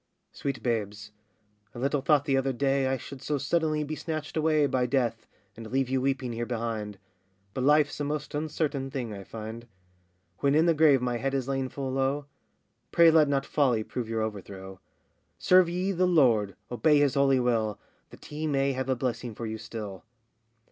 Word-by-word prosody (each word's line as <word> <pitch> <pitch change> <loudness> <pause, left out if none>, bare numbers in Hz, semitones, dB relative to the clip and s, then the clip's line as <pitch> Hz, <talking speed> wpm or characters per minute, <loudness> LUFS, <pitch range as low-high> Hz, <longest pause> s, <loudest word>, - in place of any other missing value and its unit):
Sweet 140 -2 -4
babes, 110 -3 -2 0.6
I - - -8
little 140 +3 0
thought 145 +1 +3
the 135 - +1
other 135 0 +1
day, 135 +1 +1
I 135 0 0
should 130 +2 -10
so 150 +1 -1
suddenly 155 +1 0
be 150 +1 -5
snatched 155 -2 -5
away 155 -1 +3
By 130 -3 0
Death, 120 -3 -1 0.3
and 115 -1 -9
leave 135 -1 0
you 130 0 +1
weeping 130 -2 -1
here 120 +1 -3
behind; 110 -4 -3 0.6
But 130 - -2
life's 150 0 +3
a - - -1
most 145 0 -3
uncertain 150 -2 -2
thing, 125 -5 -4
I 100 -1 -8
find. 110 +3 -8 0.7
When 140 0 +2
in 160 +2 +4
the 170 - +4
grave 150 -5 +4
my 125 -1 0
head 135 +3 -2
is 135 -2 -2
lain 135 -1 -1
full 135 -1 -4
low, 135 +2 0 0.7
Pray 170 -1 +6
let 155 -2 +5
not 140 -1 0
folly 125 -7 +1
prove 115 0 -5
your 110 -1 -1
overthrow; 95 -3 -7 0.6
Serve 185 -1 +5
ye 180 +3 -1
the 185 0 +2
Lord, 120 - +3 0.2
obey 145 +6 +3
his 145 -2 +3
holy 140 -2 +3
will, 115 -4 0 0.3
That - - -15
he 155 +1 -4
may 140 -1 +1
have 130 0 -3
a 130 - +2
blessing 120 -2 -3
for 115 - -5
you 110 0 -5
still. 100 -7 -7
135 Hz, 190 wpm, -28 LUFS, 115-145 Hz, 0.7 s, Pray